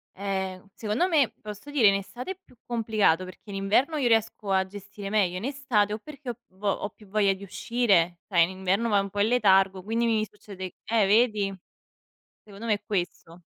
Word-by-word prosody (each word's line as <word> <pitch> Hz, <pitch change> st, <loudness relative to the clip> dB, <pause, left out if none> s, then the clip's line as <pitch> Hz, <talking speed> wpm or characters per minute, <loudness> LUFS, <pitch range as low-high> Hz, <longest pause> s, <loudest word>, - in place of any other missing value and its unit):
Eh. 190 Hz, -1 st, -3 dB
Secondo 220 Hz, +11 st, 0 dB
me, 300 Hz, -9 st, +3 dB
posso 210 Hz, +6 st, -9 dB
dire, 280 Hz, -7 st, +4 dB
in 200 Hz, -, +5 dB
estate 240 Hz, -, -5 dB
è 380 Hz, -, -7 dB
più -, -, -22 dB
complicato 215 Hz, -7 st, +2 dB
perché 185 Hz, +3 st, -12 dB
in 200 Hz, -, -5 dB
inverno 215 Hz, +11 st, +2 dB
io 270 Hz, -4 st, +1 dB
riesco 225 Hz, -3 st, +1 dB
a 190 Hz, 0 st, +3 dB
gestire 200 Hz, +1 st, -8 dB
meglio, 195 Hz, -4 st, +1 dB
in 195 Hz, -, -5 dB
estate 255 Hz, -7 st, +1 dB
o 215 Hz, -, -4 dB
perché 280 Hz, +1 st, -9 dB
ho 235 Hz, -, -4 dB
vo 195 Hz, +2 st, -3 dB
ho 200 Hz, -, -1 dB
più 210 Hz, -, -19 dB
voglia 200 Hz, 0 st, +2 dB
di 190 Hz, +1 st, -10 dB
uscire, 195 Hz, -4 st, +1 dB
sai 170 Hz, -4 st, +4 dB
in 165 Hz, -, 0 dB
inverno 195 Hz, +5 st, +1 dB
vai 205 Hz, -2 st, +4 dB
un 195 Hz, -, -5 dB
po' 205 Hz, -, -5 dB
in 205 Hz, -, +4 dB
letargo 195 Hz, -5 st, +3 dB
quindi 225 Hz, +3 st, 0 dB
mi 220 Hz, -2 st, +2 dB
succede 195 Hz, -3 st, -9 dB
eh 225 Hz, -2 st, +3 dB
vedi? 210 Hz, -2 st, +3 dB, 0.9 s
Secondo 205 Hz, +2 st, -10 dB
me 220 Hz, -, +3 dB
è 205 Hz, -, -6 dB
questo. 175 Hz, -3 st, -4 dB
205 Hz, 205 wpm, -27 LUFS, 195-230 Hz, 0.9 s, in